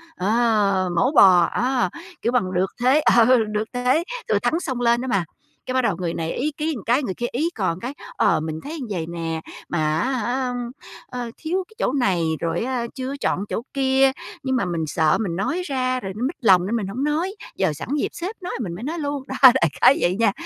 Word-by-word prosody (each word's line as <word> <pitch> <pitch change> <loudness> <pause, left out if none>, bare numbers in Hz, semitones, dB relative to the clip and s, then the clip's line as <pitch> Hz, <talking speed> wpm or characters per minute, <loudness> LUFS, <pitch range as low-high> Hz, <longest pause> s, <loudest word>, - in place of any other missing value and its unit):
ờ, 205 -3 +2
mổ 250 +10 +3
bò 185 - +7
á, 250 0 +1 0.3
kiểu, 235 - +1
bằng 190 -7 0
được 185 +1 0
thế 260 +4 +4 0.2
ờ, 235 -1 +7 0.3
được 210 +1 -1
thế 250 +6 +2 0.3
thừa - - +3
thắng 325 - +1
xông 260 -8 -3
lên 235 0 +3
đó 260 - -4
mà. 195 -8 +1 0.4
Cái, 255 - -3
bắt 260 - +3
đầu 220 -7 +1
người 170 -2 -2
này 165 0 -3
ý 295 +4 -1
kiến 315 0 -1
một 205 - -9
cái 245 +6 +2
người 195 - -2
kia 240 - -4
ý 305 +8 0
cò 185 -5 0
cái 250 +4 -4 0.2
"Ờ, - - +3
mình 155 0 -4
thấy 315 +3 -6
vầy 175 -5 -2
nè, 165 -1 -4 0.3
mà 155 -2 0
á 260 - 0
hả, 250 +1 -1 0.5
ờ, 245 -2 -5
thiếu 360 +4 -2
cái 440 - -21
chỗ 260 - +1
này 195 -11 +1 0.2
rồi 165 +1 -1
á 250 -1 -2
chưa 260 +1 -4
chọn 195 - 0
chỗ - - -2
kia, 270 0 +3 0.3
nhưng 260 -1 0
mà 235 - +1
mình 170 -3 -2
sợ 155 +1 +2
mình 180 -6 -2
nói 320 - -1
ra 255 -3 -1
rồi 195 -3 -6
nó 220 - -4
mích 325 - -5
lòng 185 -6 +5
nên 215 +5 -1
mình 215 -5 -2
hổng 240 +8 -3
nói, 325 +7 -1 0.2
giờ 155 - +1
sẵn 150 - -8
dịp - - +1
sếp 370 +6 -5
nói 360 - -5
mình 175 - -4
mới 200 - -8
nói 320 +6 -3
luôn", 285 -2 -3
đó, - - -5
đại 245 -10 +7
khái 275 - +7
vậy 175 +1 +2
nha. 225 -3 +4
240 Hz, 230 wpm, -22 LUFS, 185-265 Hz, 0.5 s, bò